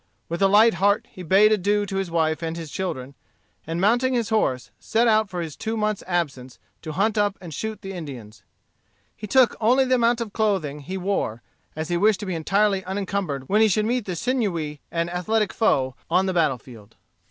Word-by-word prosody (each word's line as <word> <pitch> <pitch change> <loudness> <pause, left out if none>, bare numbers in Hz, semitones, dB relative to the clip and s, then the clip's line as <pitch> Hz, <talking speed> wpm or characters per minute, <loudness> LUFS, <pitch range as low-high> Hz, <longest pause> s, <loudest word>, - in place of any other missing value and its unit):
With 170 +2 -3
a 195 - +6
light 215 +4 +6
heart 200 +4 +1
he 185 - -10
bade 195 +5 +5
adieu 205 0 +1
to 195 -1 -4
his 195 -2 -2
wife 160 -1 0
and 165 0 -3
his 160 -3 -7
children, 140 -8 -4 0.5
and 165 +1 -3
mounting 240 +6 +2
his 230 -2 -1
horse, 130 - 0
set 235 +1 +1
out 215 -2 +3
for 180 -2 -4
his 160 -3 -6
two 225 0 -3
months' 215 -1 -1
absence 140 -8 -2 0.2
to 155 -2 -6
hunt 210 +5 +1
up 205 -1 +1
and 170 -4 -9
shoot 220 +6 -5
the 195 0 -6
Indians. 125 - -9 0.7
He 210 - -8
took 255 0 +4
only 255 +5 +4
the 255 - +1
amount 240 -1 +3
of 225 -4 -5
clothing 190 -10 0
he 185 +7 -6
wore, 180 - -2 0.3
as 155 +2 -4
he 175 - +1
wished 210 +2 +3
to - - -4
be 185 - -3
entirely 195 +4 +1
unencumbered 190 -8 -3
when 210 +2 +3
he 220 - +6
should 210 +1 +1
meet 240 0 0
the 185 - -4
sinewy 170 - -2
and 170 0 -1
athletic 200 +5 -1
foe 130 - +1 0.2
on 180 +3 +3
the 190 - -1
battle 155 -7 +2
field. 110 -3 -15
190 Hz, 210 wpm, -23 LUFS, 160-215 Hz, 0.7 s, a